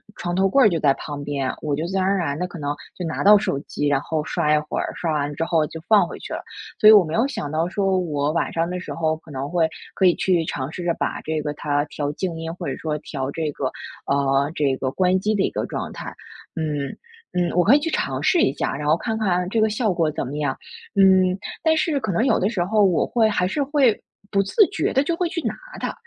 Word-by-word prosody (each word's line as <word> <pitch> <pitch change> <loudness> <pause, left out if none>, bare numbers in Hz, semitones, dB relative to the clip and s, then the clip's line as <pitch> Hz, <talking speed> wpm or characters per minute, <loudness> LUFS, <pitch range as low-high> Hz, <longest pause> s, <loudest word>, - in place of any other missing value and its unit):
床 175 0 -3
头 195 +1 +3
柜 270 +7 +5
儿 - - +7
就 170 -5 0
在 145 -3 +4
旁 145 -2 -6
边， 140 -2 -2
我 150 -2 -1
就 155 +3 -3
自 190 +3 -4
然 190 - +2
而 195 +1 +2
然 150 -5 -2
地 180 - -1
可 175 - -10
能 145 -1 -3 0.2
就 180 - -4
拿 160 - -3
到 210 +1 +8
手 195 -8 -1
机 145 0 -3
然 140 -1 +2
后 155 0 -2
刷 155 -1 0
一 - - +4
会 - - -2
儿， - - -2
刷 165 - -2
完 145 -1 -1
之 165 - -1
后 165 -2 +2
就 160 - -8
放 215 -2 +5
回 - - -8
去 - - -8
了。 - - -4 0.4
所 215 - +8
以 - - +10
我 205 -4 +7
没 155 - -5
有 230 +7 +2
想 150 - -5
到 160 +3 0
说 190 -1 +1
我 150 -4 -1
晚 165 - -1
上 165 0 0
的 180 +1 -4
时 180 - -7
候 160 -1 0
可 160 - -19
能 135 -1 -4
会 165 -2 +2 0.2
可 190 - +3
以 175 - +4
去 180 -3 +1
尝 135 -1 -4
试 175 - -6
着 175 - +1
把 - - -2
这 160 0 -2
个 150 -1 -2
它 145 0 -1
调 145 -1 -3
静 180 +1 -3
音 165 0 -4
或 180 - -7
者 - - -2
说 155 -2 -2
调 135 -3 -4
这 155 0 -2
个 - - -4 0.4
啊 140 0 +1
这 140 -3 +1
个 130 - -2
关 185 +4 +2
机 210 +3 0
的 195 - +1
一 - - +1
个 - - -2
状 - - -5
态。 - - -7 0.4
嗯 150 -3 -3 0.4
嗯， 175 -1 +1
我 180 - +4
可 235 +9 +6
以 - - +4
去 320 +3 -2
尝 - - -1
试 355 - +3
一 - - +3
下， - - -2
然 145 +1 -4
后 155 - +5
看 220 +4 -3
看 180 -4 +1
这 225 - 0
个 220 - +3
效 215 -1 0
果 165 -3 +1
怎 - - -3
么 140 +3 -5
样。 145 -3 -1 0.4
嗯， 190 -1 +5 0.3
但 320 -1 +4
是 310 -2 +1
可 220 -6 -2
能 205 +8 +1
有 255 - +3
的 195 - +1
时 200 -6 -1
候 210 +2 +3
我 185 -4 +3
会 230 -2 +2
还 190 -4 +1
是 285 +10 -1
会 270 -5 +2 0.3
不 195 - +3
自 405 - +4
觉 - - 0
地 270 - +3
就 330 +3 -1
会 355 - 0
去 335 - -3
拿 - - -1 0.3
它， - - -3
175 Hz, 290 characters per minute, -22 LUFS, 150-200 Hz, 0.4 s, 以